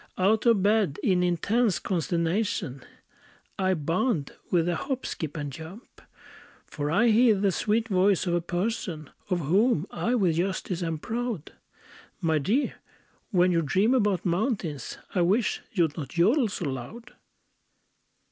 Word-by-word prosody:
Out 210 +5 +2
of 220 -5 +4
bed, 205 -7 +2
in 185 -3 +3
intense 190 +5 +1
consternation, 170 - -1 0.8
I 190 -1 +2
bound 165 - -1 0.2
with 175 -2 +2
a 175 - +1
hop, 265 - -3
skip, 160 -1 -4
and 145 -2 -4
jump. 165 - -11 0.6
For 145 -1 -4
I 210 +9 +3
hear 225 0 +5
the 195 0 +1
sweet 220 +5 0
voice 190 -2 +2
of 175 - 0
a 175 - +1
"person" 175 -4 -3 0.2
Of 180 -2 0
whom 185 - +2
I 240 +2 0
with 180 -8 +2
justice 185 0 -2
am 165 -2 -2
proud, 230 -2 -4 0.7
"_My 160 -2 +2
dear, 230 - +1 0.6
when 180 -3 +3
you 170 -1 +2
dream 190 - +2
about 205 -8 +1
mountains, 175 - -2 0.2
I 180 - +1
wish 205 +7 +1
you'd 165 -7 +1
not 145 -6 -5
jodel 220 - +3
so 185 -3 -4
loud! 135 - -6
185 Hz, 145 wpm, -27 LUFS, 165-220 Hz, 0.8 s, hear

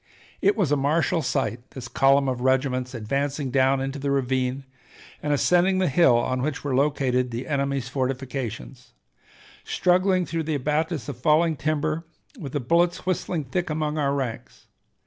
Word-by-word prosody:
It 200 +2 +3
was 180 -9 +1
a - - +4
martial 150 +3 +1
sight, 135 -4 -1 0.2
this 125 -2 -6
column 135 +2 +3
of 125 -2 -2
regiments 130 -1 0
advancing 135 +4 -2
down 135 +1 +3
into 135 +1 -3
the 140 +1 -2
ravine 130 -1 0 0.6
and 150 - -1
ascending 180 +6 +3
the 185 -1 +2
hill 135 -4 +4
on 130 +2 -1
which 140 0 -3
were 145 -2 -2
located 130 -2 +1
the 120 +2 -5
enemy's 140 -3 -1
fortifications, 130 - -4 0.7
struggling 185 0 +2
through 165 -1 -2
the 155 -2 0
abatis 150 0 -1
of 140 - -5
fallen 155 +4 +3
timber, 155 +2 -1 0.4
with 140 -7 -7
the 145 - 0
bullets 170 +8 +1
whistling 180 -3 -1
thick 175 +7 -3
among 155 0 -1
our 140 -1 +1
ranks. 130 -5 -5
140 Hz, 160 wpm, -24 LUFS, 130-155 Hz, 0.7 s, a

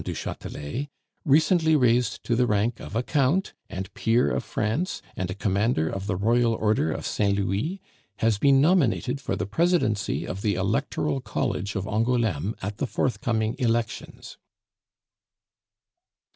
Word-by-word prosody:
du - - -4
Chatelet, 95 - -5 0.4
recently 160 +2 +4
raised 120 -4 +2
to 120 - 0
the 125 +1 +2
rank 110 +3 +1
of - - -8
a 115 - +1
Count 150 +7 +1 0.2
and 95 +1 -6
Peer 115 +2 +2
of - - -1
France 120 - -2 0.2
and 95 -1 -3
a 90 - -4
Commander 100 -4 +1
of 95 +3 -4
the 100 - 0
Royal 115 +4 +2
Order 105 -7 +1
of - - -4
St. 100 -1 +1
Louis, 100 - -1 0.4
has 110 -1 +1
been 135 +3 +5
nominated 140 -5 +2
for 95 - -2
the 100 -1 -2
presidency 110 - +1
of 95 +2 -5
the 100 -2 +1
electoral 110 +9 -1
college 100 -4 -2
of 95 -1 -2
Angouleme 110 -4 0
at 100 +1 -4
the 140 - -1
forthcoming 110 -1 -1
elections." 115 -2 -2
115 Hz, 145 wpm, -25 LUFS, 100-130 Hz, 0.4 s, been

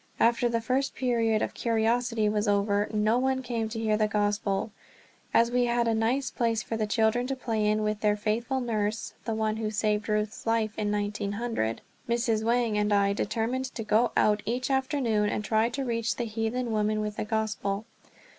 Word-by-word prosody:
After 235 +1 +3
the 230 -1 0
first 260 +4 0
period 230 -4 +1
of - - -3
curiosity 230 -1 +1
was 210 0 0
over, 205 0 +2
no 215 +2 +2
one 260 0 0
came 230 -3 -2
to 225 - -6
hear 215 -1 +1
the 215 0 +2
Gospel. 205 -1 0 0.6
As 235 +1 +4
we 245 0 +2
had 235 0 +1
a 225 - +2
nice 235 +5 0
place 230 -3 0
for 225 - -4
the 215 -1 -1
children 225 +3 +2
to 270 - -2
play 225 -4 -1
in 215 0 +1
with 210 0 -1
their 210 -1 +2
faithful 230 +5 -1
nurse, 215 -2 -2
the 225 -1 -1
one 220 0 0
who 220 -1 -2
saved 210 0 0
Ruth's 210 +1 -2
life 225 -1 +1
in 210 -1 -1
1900, 205 - -2 0.3
Mrs. 235 -2 +1
Wang 230 -2 +1
and 210 0 +1
I 200 -1 +3
determined 225 +5 -1
to 255 -3 -6
go 220 +3 +2
out 210 0 +3
each 250 +5 -2
afternoon 260 -6 +1
and 210 - -2
try 220 +1 +2
to 270 +2 -3
reach 230 -4 -1
the 240 - -2
heathen 225 +2 -2
women 215 0 +1
with 210 0 -4
the - - -1
Gospel. 215 -1 -2
220 Hz, 195 wpm, -28 LUFS, 210-235 Hz, 0.6 s, As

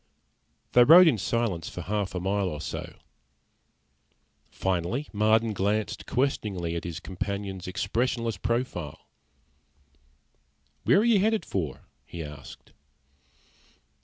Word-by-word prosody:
They 120 - +7
rode 170 +7 +9
in 125 -9 +3
silence 100 -4 -1
for - - -7
half 100 -1 -2
a - - -1
mile 95 +1 0
or 75 - -5
so. - - -6 1.5
Finally 95 - -2
Marden 110 +1 +3
glanced 105 +2 -1
questioningly 100 -10 -1
at 85 - -4
his 85 0 -5
companion's 95 0 -5
expressionless 115 +3 -1
profile. 115 - -3 1.8
"Where - - +5
are - - +1
you 230 -4 +5
headed 220 +2 +1
for?" 80 -8 -3 0.2
he 85 -1 -7
asked. 75 -2 -11
100 Hz, 110 wpm, -27 LUFS, 90-120 Hz, 1.8 s, rode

